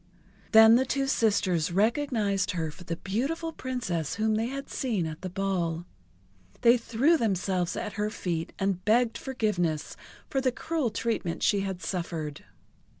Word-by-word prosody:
Then 220 +1 +8
the 260 - +2
two 275 +1 0
sisters 200 - +1
recognized 210 -1 +1
her 160 -3 -2
for 150 - -13
the 170 -1 -3
beautiful 275 - -2
Princess 180 - -3
whom 220 +1 +1
they 220 +2 0
had 275 +2 -5
seen 220 -10 -1
at 155 -1 -6
the 185 - -4
ball. 175 -3 -1 0.8
They 235 +1 +7
threw 250 +7 +2
themselves 190 - 0
at 210 - -4
her 210 - +1
feet, 170 -6 -3
and 195 -2 -1
begged 230 +3 +3
forgiveness 180 - -1 0.3
for 270 - -1
the 260 -1 +2
cruel 310 0 -1
treatment 210 -6 -2
she 205 - +3
had 190 -2 -4
suffered. 165 -5 -4
205 Hz, 150 wpm, -28 LUFS, 175-240 Hz, 0.8 s, Then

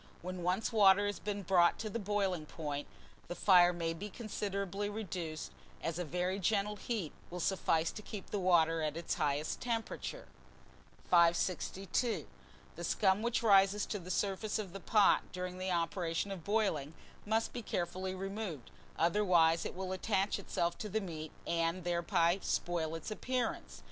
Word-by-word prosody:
When 185 0 -5
once 180 +5 0
water 200 -2 +6
has 205 0 -2
been 205 -1 -3
brought 175 -2 +4
to 220 - -4
the 215 +2 -3
boiling 195 -6 -1
point, 145 -3 -4 0.4
the 175 - -5
fire 180 -3 +6
may 165 -1 -2
be 200 +6 -6
considerably 200 -2 -3
reduced, 175 - -5 0.3
as 165 +1 -2
a - - 0
very 180 +4 -1
gentle 205 +2 +1
heat 205 -7 -3 0.2
will 180 - -6
suffice 165 -3 +1
to - - -8
keep 210 -1 -8
the 205 - -1
water 165 -3 +3
at 155 0 -1
its 170 - -2
highest 145 +1 -1
temperature. 235 - -3 0.8
562. 185 +6 +2 0.5
THE - - -7
SCUM 195 -1 +2
WHICH 235 +1 0
RISES 200 -1 +5
to 205 - -3
the 180 0 -10
surface 200 +3 -1
of 200 -5 -5
the 195 - -6
pot 210 +1 +3
during 180 0 -5
the 185 0 -2
operation 170 +1 -1
of 185 -4 -6
boiling 180 -8 0 0.3
must 220 +2 0
be 245 - -4
carefully 185 -1 -3
removed, 195 - -5 0.3
otherwise 170 -2 +3
it - - -4
will 185 0 -4
attach 195 +1 0
itself 170 -3 -1
to 215 - -4
the 220 +3 0
meat, 160 -6 -6
and 170 +1 0
thereby 175 +1 +2
spoil 165 -2 -1
its 165 +5 -6
appearance. 245 +2 -2
185 Hz, 160 wpm, -34 LUFS, 170-205 Hz, 0.8 s, water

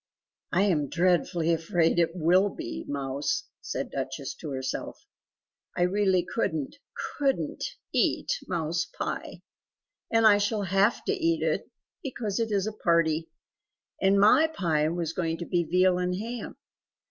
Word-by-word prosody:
"I 185 +2 +3
am 155 -9 +1
dreadfully 170 -1 +2
afraid 165 +1 +1
it 165 0 +1
WILL 180 +4 +4
be 65 - -6
mouse!" 140 - -2 0.2
said - - -4
Duchess - - -4
to 155 - -7
herself 130 -1 -4 0.7
"I 175 - +3
really 190 -1 +2
couldn't, 160 - -2 0.4
COULDN'T 275 -2 0 0.3
eat - - +1 0.2
mouse 170 -1 -1
pie. - - -4 0.7
And 225 0 +3
I 205 -1 +7
shall 205 0 0
have 195 +5 +2
to - - +1
eat 335 -4 +1
it, - - -1 0.3
because 230 -7 -3
it 225 -1 -1
is 200 -2 +1
a 215 - -3
party. 165 -4 +1 0.7
And 195 +1 +4
MY 220 +10 +6
pie 160 - 0
was 165 -1 -2
going 165 -2 -1
to 170 - -5
be 175 0 +1
veal 180 +2 +3
and 180 0 0
ham. 230 +4 -5
180 Hz, 145 wpm, -27 LUFS, 165-205 Hz, 0.7 s, I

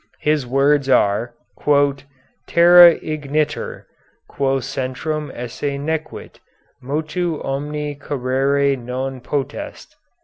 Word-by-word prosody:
His 150 -4 +1
words 135 +2 +2
are: 115 0 +2 1.1
"Terra 175 0 +8
igitur, 150 0 -3 0.5
quæ 135 -1 0
centrum 140 +3 -4
esse 130 +4 -4
nequit, 155 +2 -5 0.4
motu 155 +4 -2
omni 145 +2 -3
carere 140 +1 0
non 130 +1 -5
potest." 140 0 -5
140 Hz, 80 wpm, -20 LUFS, 130-155 Hz, 1.1 s, Terra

